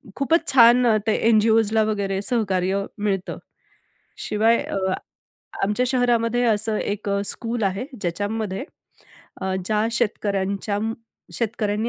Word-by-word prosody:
खूपच 325 +5 +1
छान 245 -1 +6
अ, 220 - +4
ते 215 - +3 0.2
एन-जी-ओजला 220 0 +3
वगैरे 200 -2 -1
सहकार्य 195 -3 0
मिळतं. 200 -3 -2 0.8
शिवाय 225 +2 +2
अ, - - -4 0.9
आमच्या 210 +5 +1
शहरामध्ये 245 -1 +1
असं 215 -1 +1
एक 205 0 -3
अ, 200 0 0
स्कूल 230 +2 -3
आहे, 195 +4 -1 0.2
ज्याच्यामध्ये 205 +4 -3 0.8
अ, 190 0 -2
ज्या 215 +2 +1
शेतकऱ्यांच्या 200 -3 -1
अं, 220 +2 -1 0.4
शेतकऱ्यांनी 220 -1 -1
215 Hz, 115 wpm, -23 LUFS, 200-230 Hz, 0.9 s, छान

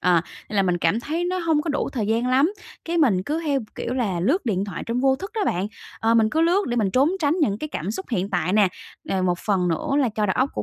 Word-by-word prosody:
Ờ, 175 -2 +4 0.3
nên 210 - -4
là 195 - +4
mình 180 -2 +1
cảm 170 +8 +1
thấy 320 +7 -2
nó 365 +1 -1
hông 320 -4 +1
có 325 - -2
đủ 290 - -1
thời 220 -6 -1
gian 230 +3 +1
lắm, 270 +8 +3 0.3
cái 340 +1 -2
mình 220 - +3
cứ 305 - -2
theo, 280 -2 +1
kiểu 250 - -3
là, 205 -9 -1
lướt 265 - +1
điện 195 -3 0
thoại 195 -5 -6
trong 235 +2 -1
vô 265 0 +3
thức 390 +8 -7
đó 440 - -1
bạn, 180 +3 0 0.3
ờ, 225 +1 +3
mình 220 -1 +4
cứ 320 - +1
lướt 355 +5 +3
để 240 - -1
mình 210 -5 +1
trốn 270 - +3
tránh 300 0 +2
những 205 -8 +1
cái 305 - -4
cảm 180 - -4
xúc 380 - -5
hiện 195 -3 -1
tại 180 -1 0
nè. 205 -2 +5 0.4
Nè, 190 - -1
một 180 -1 +1
phần 185 -4 0
nữa 165 +8 -2
là 270 -4 +3
cho 215 -1 +1
đầu 190 - 0
óc 260 - +2
của - - -3
230 Hz, 290 wpm, -23 LUFS, 190-295 Hz, 0.4 s, nè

